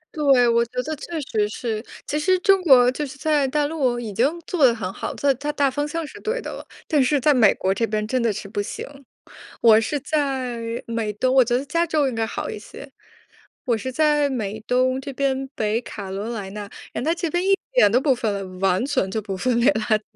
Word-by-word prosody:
对， 275 -5 +4
我 235 0 +3
觉 235 - -22
得 310 +3 -4
确 320 +3 -6
实 215 -6 -1
是。 220 0 -4 0.2
其 300 - -2
实 370 +5 +3
中 390 0 +4
国 260 -8 +6
就 295 - -4
是 270 -1 -7
在 295 -2 +1
大 295 +2 0
陆 275 -6 0
已 225 -4 -6
经 245 +9 +2
做 350 -6 -1
得 250 -3 +7
很 190 -5 -4
好 - - -5
了， - - -7
它 280 -1 +2
它 290 +4 -4
大 285 -2 +1
方 290 +3 -2
向 330 +2 -3
是 - - -11
对 460 +3 -2
的 - - -6
了。 - - -8 0.2
但 295 -3 +3
是 285 +3 +2
在 295 +3 +4
美 225 -6 +5
国 190 +1 0
这 230 +4 -1
边 215 0 -1
真 255 +3 0
的 230 -1 +2
是 200 - -6
不 205 +1 -3
行。 205 - -6 0.8
我 220 -2 +7
是 225 +6 -1
在 265 -5 -1 0.3
美 225 -2 -2
东， 255 +5 0
我 260 -2 +6
觉 240 +1 +1
得 260 - -3
加 335 +4 0
州 305 -4 +1
应 - - -5
该 225 0 0
好 - - -4
一 - - -6
些。 270 +5 -12 0.7
我 235 -3 +1
是 240 +4 -5
在 295 +1 +2
美 220 -5 -3
东 255 +1 +2
这 275 +1 -7
边 270 0 -1
北 215 +1 0
卡 200 -5 -8
罗 200 +4 -4
来 210 -5 -5
纳， 210 +1 -6 0.3
然 - - -3
后 305 - 0
它 - - 0
这 340 -1 -2
边 350 +3 -1
一 390 - +4 0.2
点 - - +5
都 245 - +4
不 270 -2 +3
分 225 -4 -1
类， 200 - -3 0.2
完 190 +2 +2
全 270 -9 0
就 220 - -2
不 195 -2 -5
分 240 +3 +1
类 245 - +4
垃 220 -1 +1
圾。 - - -17
255 Hz, 270 characters per minute, -22 LUFS, 220-290 Hz, 0.8 s, 得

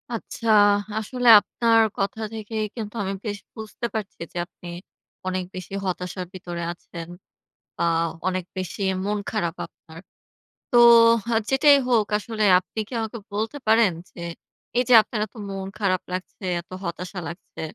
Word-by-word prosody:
আচ্ছা 230 0 -5 0.5
আসলে 245 +3 -2
আপনার 230 +2 +2 0.2
কথা 200 +3 -2
থেকে 220 0 -6 0.2
কিন্তু 220 -2 -6
আমি 195 0 -2
বেশ 205 -1 -2 0.2
বুঝতে 220 +2 -6
পারছি 215 -3 -4
যে - - -8
আপনি 175 0 -14 0.6
অনেক 185 0 -1
বেশি 185 +1 -8
হতাশার 180 0 -3
ভিতরে 175 -2 -6
আছেন 170 -1 -10 0.7
বা - - -1 0.4
অনেক 185 -1 -1
বেশি 185 +2 -4 0.2
মন 210 +1 0
খারাপ 175 -6 -1
আপনার। 160 0 -15 0.7
তো 245 - +4 0.6
আ - - +2
যেটাই 280 +2 +6
হোক 225 -4 +3
আসলে 215 +1 -3 0.2
আপনি 185 +4 -8
কী 250 - -10
আমাকে 220 +1 -4 0.2
বলতে 220 +7 -2
পারেন? 220 -2 +5 0.2
যে, - - -14 0.6
এই 250 - +4
যে - - +6
আপনার 215 +1 -5
এত 205 - -22 0.2
মন 195 -1 -5
খারাপ 185 -3 +1
লাগছে, 185 +2 -6 0.2
এত 170 - -31 0.2
হতাশা 180 +2 -5
লাগছে 170 +2 -9
205 Hz, 150 wpm, -24 LUFS, 185-225 Hz, 0.7 s, যেটাই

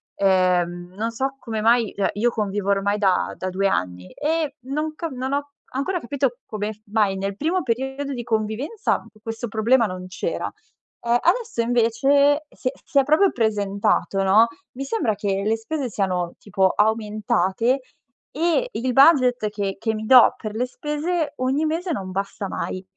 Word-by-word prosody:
ehm, 180 -2 +1
non 225 +2 -1
so 270 +4 -2
come 220 -4 -4
mai, 230 -1 +3
cioè, 200 - +1
io 235 +4 +1
convivo 205 -3 -2
ormai 200 +1 +1
da 195 -3 +1
da 185 - -3
2 195 +2 +1
anni 90 - -2
e 305 -1 -1
non 300 +5 -3
ca 330 +1 -4
non 260 +1 -4
ho 285 0 -2 0.3
ancora 355 +8 -1
capito 265 -2 -1
come 215 0 -3
f 210 - -25
mai 205 -2 +1
nel 195 0 -3
primo 330 - 0
periodo 270 +3 -2
di 240 -2 -4
convivenza 225 - -1 0.2
questo 225 +2 -5
problema 230 +3 +3
non 185 -2 -6
c'era, 460 - -3 0.6
ehm, 235 0 +2
adesso 445 - +1
invece 270 +6 +3
si - - -6
è - - -6
si 280 - +2
è - - +4
proprio 310 +8 +4
presentato, 205 -3 0
no, 210 +4 +5 0.3
mi 270 +2 -5
sembra 260 - 0
che 200 -1 -1
le 220 +2 +1
spese 265 +3 -3
siano 185 -4 -1
tipo 195 -2 +1
aumentate 215 +2 +1 0.5
e 340 - +1
il 250 - -2
budget 255 -6 +5
che 200 -2 -3
che 225 -1 -1
mi 215 0 -5
do 250 +1 +7
per 215 -1 -6
le 245 +3 0
spese, 300 +4 -2
ogni 265 +4 0
mese 335 +3 -1
non 195 -11 -3
basta 195 +1 -3
mai. 185 0 -4
230 Hz, 170 wpm, -23 LUFS, 200-275 Hz, 0.6 s, do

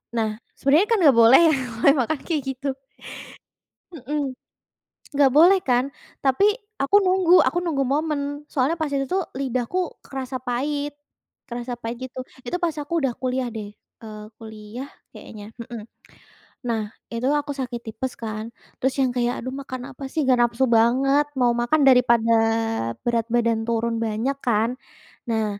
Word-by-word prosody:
Nah 220 -1 +1 0.3
sebenarnya 300 +9 +3
kan 455 - +3
nggak 270 -6 +6
boleh 235 +6 +8
ya 310 - +4 0.3
makan-makan 280 +1 +3
kayak 315 -4 0
gitu. 270 +2 -5 1.3
Mhm, 280 -1 -3 0.8
nggak 275 -2 +5
boleh 350 +7 +6
kan, 250 +1 +2 0.4
tapi 270 +9 +3 0.4
aku 275 +9 +2
nunggu 370 -2 +3
aku 350 - 0
nunggu 295 -6 0
momen 300 +2 0 0.3
soalnya 275 +4 +1
pas 315 -3 -3
itu 275 -1 0
tuh 375 0 0 0.2
lidahku 270 +7 -2
kerasa 265 -1 -6
pahit 285 +4 -2 0.6
kerasa 240 +1 -5
pahit 230 +1 -4
gitu. 260 0 -7 0.2
Itu 255 +9 -3
pas 335 -3 -1
aku 310 +3 -2
udah 265 -4 0
kuliah 255 0 -2
deh, 210 -2 -6 0.3
eee, 215 -1 -8
kuliah 220 +4 -9 0.3
kayaknya, 210 -1 -10
mhm. 235 -1 -8 0.9
Nah 225 -2 0 0.3
itu 230 +2 -2
aku 290 -1 -1
sakit 250 -3 -4
tipes 245 +3 -4
kan 220 0 -5 0.3
terus 265 0 +1
yang 255 -2 +1
kayak, 245 0 0
"Aduh 255 +2 -5
makan 260 -2 -6
apa 275 - -9
sih 310 -5 -1
nggak 255 - +5
nafsu 240 +2 +2
banget 255 +5 +3
mau 240 -1 +3
makan," 240 +6 +1
daripada 235 -3 +5 0.7
berat 230 -1 +1
badan 230 -1 +1
turun 230 0 -1
banyak 225 +5 -1
kan. 230 +1 +1 0.6
Nah 220 -1 +1
255 Hz, 150 wpm, -23 LUFS, 235-285 Hz, 1.3 s, boleh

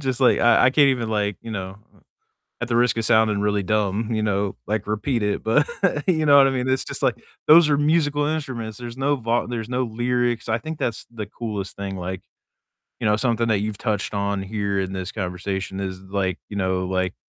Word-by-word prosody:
Just 130 -2 -2
like, 125 - +5
I 120 - +5
I 130 - +5
can't 145 0 +5
even 120 -4 0
like, 105 -2 -1
you 115 - -7
know, 95 -2 -5 0.8
at 120 - -1
the 115 - 0
risk 120 0 +3
of 115 - -1
sounding 110 -3 +3
really 105 -1 +1
dumb, 105 +2 0
you 110 -1 0
know, 100 -1 0
like 105 0 -2
repeat 110 +2 -1
it, 105 0 -1
but 145 +7 +3 0.4
you 160 -4 +2
know 145 -1 +7
what 135 - +7
I 135 - +1
mean? 130 0 -1
It's 130 0 0
just - - -6
like - - +3 0.3
those 155 0 +8
are 145 - +3
musical 145 -1 +2
instruments. 130 -8 -3
There's 120 0 -8
no 140 +2 +1
vo 115 0 0
there's 120 -2 -4
no 125 +1 0
lyrics. 120 0 -1
I 110 - +2
think 155 +6 -7
that's 115 - -2
the 110 -2 -5
coolest 105 -2 -5
thing 100 -1 -4
like, 90 +1 -5 0.8
you 115 - -1
know, 105 - +4
something 115 -1 0
that 110 - +3
you've 105 -1 -3
touched 105 -3 -2
on 100 -1 -1
here 100 -1 -2
in 95 0 -3
this 95 0 -5
conversation 95 0 -4
is 95 -1 -4
like, 95 -1 -2
you 100 - -7
know, 95 -1 0
like 95 0 -1
110 Hz, 220 wpm, -23 LUFS, 100-125 Hz, 0.8 s, those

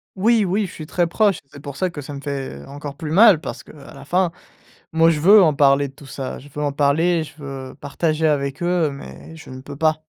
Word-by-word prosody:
Oui, 220 +2 +3
oui, 195 +3 0
je - - -11
suis 155 - -9
très 175 +2 0
proche 200 +1 +2
et - - -18
c'est 140 - -12
pour 140 -1 -8
ça 185 +3 -1
que 170 - -9
ça 145 +1 -8
me 140 - -7
fait 135 - -5
encore 145 0 -8
plus 155 +1 -6
mal 190 0 +6
parce - - -7
qu'à - - -15 0.2
la 135 0 -12
fin, 180 +3 +1 0.6
moi, 165 +1 +5
je 160 -2 +1
veux 200 +7 +7
en 155 -3 +3
parler 140 0 +3
de - - -19
tout 140 - -15
ça, 135 -1 -6
je 140 - -14
veux 150 - -3
en 145 - 0
parler, 155 +4 +1
je 150 0 -15
veux 135 -3 -8
partager 155 +2 -1
avec 140 0 -1
eux 175 -4 +1
mais 140 - -11
je 160 - -13
ne 130 0 -9
peux 140 +2 -10
pas. 155 +1 +1
150 Hz, 255 wpm, -21 LUFS, 140-170 Hz, 0.6 s, veux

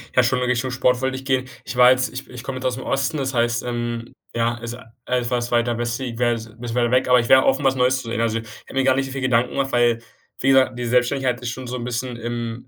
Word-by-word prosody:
Ja, 125 - +6
schon 125 +1 +1
in 125 - 0
Richtung 125 +1 0
Sport 125 0 +1
wollte 130 0 -1
ich 130 - -6
gehen. 130 -1 +1 0.2
Ich - - -7
war 125 0 +8
jetzt 130 0 +2
ich 130 - -8
ich 125 -1 -9
komme 135 -1 -5
jetzt 130 - -6
aus 125 - +1
dem 130 - -7
Osten, 135 +3 -1
das 135 -1 -2
heißt, 120 0 +1
ähm, 120 -1 -4 0.2
ja, 115 +1 +1
also 120 +1 -7 0.3
etwas 120 -1 -1
weiter 120 -1 +1
westlich 120 0 -3
wäre 120 -1 +3
jetzt 115 -1 -6
'n 115 +2 -19
bisschen 120 -1 -5
weit 120 0 +2
weg, 130 0 +3
aber 125 0 +6
ich 115 - -2
wäre 130 0 +7
offen, 135 +2 +2
was 135 -1 +3
Neues 130 0 +2
zu 115 - -8
sehen. 115 - -2
Also, 115 -1 0
ich 115 - -10 0.2
hätte - - -13
mir 135 - +1
gar 130 0 +4
nicht 135 0 0
so 135 - -7
viele 135 0 -4
Gedanken 125 -1 +2
gemacht, 135 -1 -1
weil, 120 -1 +3 0.4
wie 135 - +1
gesagt, 130 -2 +4
die 120 - -3
Selbstständigkeit 125 +1 +1
ist 120 - -3
schon 130 0 -7
so 125 - -4
'n 120 - -5
bisschen 125 0 -3
im 120 0 -5
125 Hz, 290 wpm, -22 LUFS, 120-130 Hz, 0.4 s, war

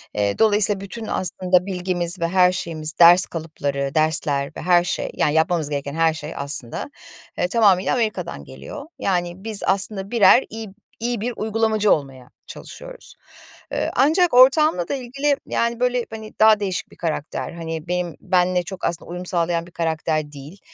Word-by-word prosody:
Eee, 100 -1 -1
dolayısıyla 205 -2 +3
bütün 220 +3 -7
aslında 180 0 +1
bilgimiz 180 -1 -1
ve 170 - 0
her 180 0 +4
şeyimiz 160 -3 -2
ders 175 +2 +8
kalıpları, 140 -4 -4
dersler 155 -3 +1
ve - - -6
her 175 -1 +4
şey 180 - -3
yani 150 - 0
yapmamız 160 -1 +1
gereken 140 -1 -4
her 165 -1 +2
şey 150 0 -7
aslında, 140 - -3 0.5
eee, 180 - +1
tamamıyla 195 -3 +3
Amerika'dan 210 - -2
geliyor. 70 - -10
Yani 175 0 -2
biz 220 -3 -3
aslında 195 +1 0
birer 230 +2 +6
iyi 225 -1 -7
b 190 - -17 0.3
iyi 235 -1 -2
bir 245 +2 -2
uygulamacı 220 -1 +1
olmaya 135 -4 -2 0.2
çalışıyoruz. - - -11 0.6
Iıı, - - -2
ancak 325 +5 +3
ortağımla 260 - +5
da - - -3
ilgili, 275 +3 -1
yani, 235 0 -1
böyle, 250 -1 0
hani, 220 -1 -9
daha 215 -1 +6
değişik 190 -3 -3
bir - - -16
karakter. 160 -3 -4
Hani, 165 -1 -6
benim 180 -2 -2
benle 180 -1 +1
çok 190 +2 -6
aslında 170 0 -2
uyum 180 +1 -6
sağlayan 170 -1 -1
bir - - -16
karakter 160 -2 -2
değil, 145 +7 -11
180 Hz, 165 wpm, -21 LUFS, 160-215 Hz, 0.6 s, ders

